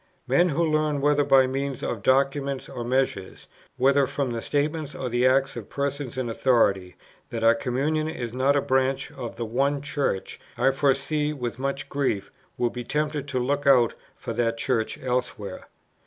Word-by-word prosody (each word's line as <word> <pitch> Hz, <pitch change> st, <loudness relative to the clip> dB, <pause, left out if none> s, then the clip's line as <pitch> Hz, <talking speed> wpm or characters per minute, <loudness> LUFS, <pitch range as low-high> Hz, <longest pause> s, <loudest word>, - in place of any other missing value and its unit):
Men 180 Hz, +1 st, +3 dB
who 170 Hz, +2 st, +1 dB
learn 155 Hz, -2 st, +1 dB
whether 145 Hz, +1 st, +3 dB
by 135 Hz, -2 st, +5 dB
means 135 Hz, +1 st, -3 dB
of 115 Hz, -, -3 dB
documents 135 Hz, +2 st, +1 dB
or 125 Hz, -3 st, -6 dB
measures, 120 Hz, -6 st, -1 dB, 0.3 s
whether 135 Hz, +1 st, +4 dB
from 135 Hz, -2 st, -2 dB
the 115 Hz, -1 st, -3 dB
statements 150 Hz, +2 st, -1 dB
or 130 Hz, -, -3 dB
the 120 Hz, +2 st, +3 dB
acts 135 Hz, +1 st, +2 dB
of -, -, -7 dB
persons 140 Hz, -2 st, -3 dB
in 130 Hz, -2 st, -1 dB
authority, 100 Hz, -7 st, +2 dB, 0.3 s
that 115 Hz, -1 st, -4 dB
our 115 Hz, 0 st, +7 dB
communion 140 Hz, +6 st, -1 dB
is 120 Hz, -7 st, -5 dB
not 135 Hz, +3 st, +2 dB
a 140 Hz, -, +3 dB
branch 130 Hz, +1 st, 0 dB
of 130 Hz, -5 st, -7 dB
the 115 Hz, -, -4 dB
One 135 Hz, +5 st, 0 dB
Church, 140 Hz, -8 st, -2 dB, 0.2 s
I 135 Hz, -, +3 dB
foresee 145 Hz, +2 st, +1 dB
with 125 Hz, -4 st, -5 dB
much 135 Hz, 0 st, -2 dB
grief, 130 Hz, -9 st, -1 dB, 0.3 s
will 120 Hz, -1 st, +1 dB
be 125 Hz, -, -5 dB
tempted 150 Hz, +1 st, -2 dB
to 140 Hz, -2 st, -3 dB
look 140 Hz, +3 st, -1 dB
out 125 Hz, -4 st, +5 dB, 0.2 s
for 115 Hz, -, -6 dB
that 115 Hz, 0 st, 0 dB
Church 115 Hz, -2 st, -1 dB
elsewhere. 125 Hz, -6 st, -3 dB
135 Hz, 175 wpm, -25 LUFS, 120-145 Hz, 0.3 s, our